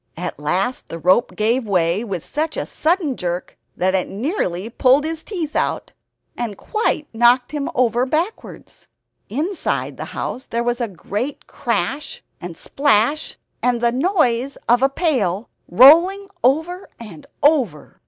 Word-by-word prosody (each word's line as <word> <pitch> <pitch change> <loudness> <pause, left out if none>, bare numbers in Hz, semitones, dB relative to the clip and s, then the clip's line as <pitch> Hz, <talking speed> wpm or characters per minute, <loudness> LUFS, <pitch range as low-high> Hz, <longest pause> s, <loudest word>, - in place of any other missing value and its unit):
At - - -5
last 190 +11 -1
the 165 - -5
rope 185 +8 +2
gave 230 +4 +1
way 180 +1 +1
with 195 -7 -4
such 310 +1 -2
a - - -2
sudden 320 -4 0
jerk 175 -2 -4 0.2
that 185 +1 +1
it 190 -1 0
nearly 205 - -2
pulled 255 +4 +3
his 320 0 -3
teeth 335 -7 -5
out, - - -1 0.4
and 225 -5 -4
quite 425 -8 -1
knocked 240 +2 +4
him 290 -2 -3
over 245 0 +2
backwards. 330 +10 -4 0.4
Inside 315 - -2
the - - -5
house 260 - -4
there 235 +1 -1
was 240 +1 -1
a 235 - 0
great 210 - -5
crash 290 +2 -3 0.2
and 170 -2 -7
splash, 285 +2 +1 0.2
and 245 -1 +1
the 235 0 +2
noise 270 - +1
of 240 +1 +4
a 270 - +4
pail 245 - 0 0.2
rolling 340 - +6
over 320 +8 +1
and 200 -10 -11 0.2
over. 260 - +1
250 Hz, 145 wpm, -20 LUFS, 210-305 Hz, 0.4 s, rolling